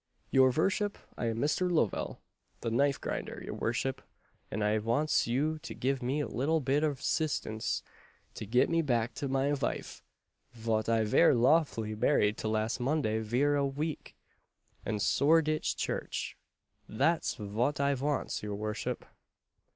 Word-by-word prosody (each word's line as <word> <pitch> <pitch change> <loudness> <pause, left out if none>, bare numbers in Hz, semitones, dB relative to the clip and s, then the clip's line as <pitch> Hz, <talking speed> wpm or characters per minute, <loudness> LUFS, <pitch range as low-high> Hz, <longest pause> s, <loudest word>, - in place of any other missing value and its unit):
"Your 130 -1 +6
vorship, 200 +8 +1 0.2
I 120 - -2
am 115 0 -1
Mister 155 +7 +1
Lovell, 155 - 0 0.4
the 115 - -2
knife 140 +3 +2
grinder, - - -4
your - - -5
vorship, 130 +3 -1 0.5
and 105 - -2
I 105 +1 +2
vantz 120 +8 +1
you 150 +6 0
to - - -8
give 135 +1 -1
me 135 +5 0
a - - -2
little 155 +6 0
bit 140 +2 +1
of 145 -3 -1
'sistance 125 -8 -1 0.5
to 110 - -7
get 125 +4 +3
me 165 0 +2
back 120 -5 -1
my 135 0 +1
vife, 140 - -3 0.5
vot 110 -1 -1
I 115 -1 +3
vere 135 +8 +5
lawfully 120 -4 +2
married 105 -2 +2
to - - -2
last 110 +2 0
Monday 125 -4 0
vere 125 +7 +1
a 140 -1 +1
veek, 150 +3 -4 0.7
at 105 -2 -1
Soreditch 155 +5 +3
Church: - - -3 0.5
that's 155 +9 +1
vot 115 +6 -1
I 140 0 +2
vantz, 140 +2 -1
your 105 -1 -4
vorship." 105 0 -3
130 Hz, 150 wpm, -31 LUFS, 110-150 Hz, 0.7 s, Your